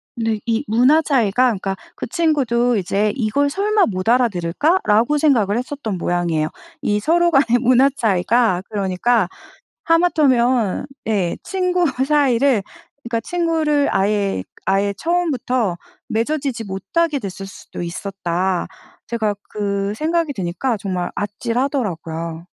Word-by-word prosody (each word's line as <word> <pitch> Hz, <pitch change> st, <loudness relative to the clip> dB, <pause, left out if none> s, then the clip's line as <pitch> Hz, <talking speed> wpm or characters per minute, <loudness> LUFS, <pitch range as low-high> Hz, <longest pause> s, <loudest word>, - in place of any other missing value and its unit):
근데 225 Hz, -2 st, -1 dB
이 230 Hz, +3 st, +1 dB
문화 255 Hz, +8 st, +4 dB
차이가 250 Hz, -4 st, +2 dB
그니까 195 Hz, -3 st, -3 dB, 0.2 s
그 -, -, -5 dB
친구도 255 Hz, -8 st, +1 dB
이제 205 Hz, +2 st, 0 dB
'이걸 270 Hz, +4 st, +1 dB
설마 410 Hz, +5 st, +2 dB
못 185 Hz, 0 st, -3 dB
알아들을까?'라고 235 Hz, -, +2 dB
생각을 230 Hz, -9 st, +2 dB
했었던 250 Hz, -6 st, -4 dB
모양이에요. 170 Hz, -3 st, 0 dB, 0.3 s
이 210 Hz, 0 st, +1 dB
서로 345 Hz, +7 st, +3 dB
간의 270 Hz, -5 st, +3 dB
문화 255 Hz, +2 st, +5 dB
차이가 205 Hz, -1 st, +2 dB
그러니까 200 Hz, +1 st, +1 dB, 0.6 s
하마터면 260 Hz, -, +2 dB, 0.2 s
예 195 Hz, -6 st, 0 dB
친구 365 Hz, -2 st, 0 dB
사이를 270 Hz, -3 st, +2 dB, 0.4 s
그러니까 235 Hz, -1 st, -2 dB
친구를 320 Hz, -3 st, +1 dB
아예 200 Hz, -, 0 dB
그 -, -, -22 dB
'아예 200 Hz, +1 st, +1 dB
처음부터 255 Hz, -, 0 dB, 0.3 s
맺어지지 255 Hz, +1 st, -1 dB
못하게 290 Hz, -, -1 dB
됐을 195 Hz, -3 st, -6 dB
수도 195 Hz, -, -9 dB
있었다.' 180 Hz, 0 st, -2 dB, 0.4 s
제가 220 Hz, -3 st, -1 dB, 0.2 s
그 200 Hz, -1 st, -2 dB
생각이 320 Hz, +1 st, 0 dB
드니까 200 Hz, +5 st, -2 dB
정말 185 Hz, -3 st, -3 dB
아찔하더라고요. 200 Hz, -, -3 dB
230 Hz, 295 characters per minute, -20 LUFS, 195-285 Hz, 0.6 s, 문화